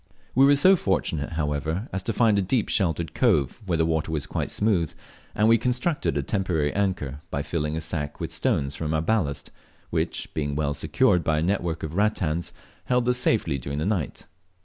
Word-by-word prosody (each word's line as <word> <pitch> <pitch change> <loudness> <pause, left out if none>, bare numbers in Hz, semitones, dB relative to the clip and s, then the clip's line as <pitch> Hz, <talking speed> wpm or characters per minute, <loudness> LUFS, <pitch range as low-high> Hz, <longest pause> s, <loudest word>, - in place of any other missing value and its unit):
We 135 +2 +6
were 145 - +6
so 185 +7 +6
fortunate, 85 - -1
however, 80 - -2
as 95 - 0
to 100 - -2
find 110 -3 +3
a - - +2
deep 105 +4 0
sheltered 85 -5 0
cove 70 - +1
where 85 -2 +1
the 80 - +2
water 80 -1 -1
was 75 -3 -2
quite - - -3
smooth, 95 -7 +1 0.4
and 105 +1 +3
we 115 0 +5
constructed 125 - 0
a 70 - 0
temporary 80 -4 0
anchor 90 -9 -1
by 70 - -2
filling 75 -1 -2
a - - -3
sack 75 -2 -4
with 80 -1 -4
stones 80 - 0
from 80 -1 -2
our 80 - +1
ballast, 85 -8 -1 0.4
which - - -2
being 75 -2 -2
well 75 -1 0
secured 85 +3 +2
by 80 -1 +1
a 75 - +1
network 85 -3 -1
of 80 0 -4
rattans 90 -5 0 0.3
held 125 -1 +1
us 125 0 +3
safely 110 - +1
during 70 +3 -5
the 75 - -1
night. 95 -7 -2
85 Hz, 195 wpm, -25 LUFS, 75-105 Hz, 0.4 s, We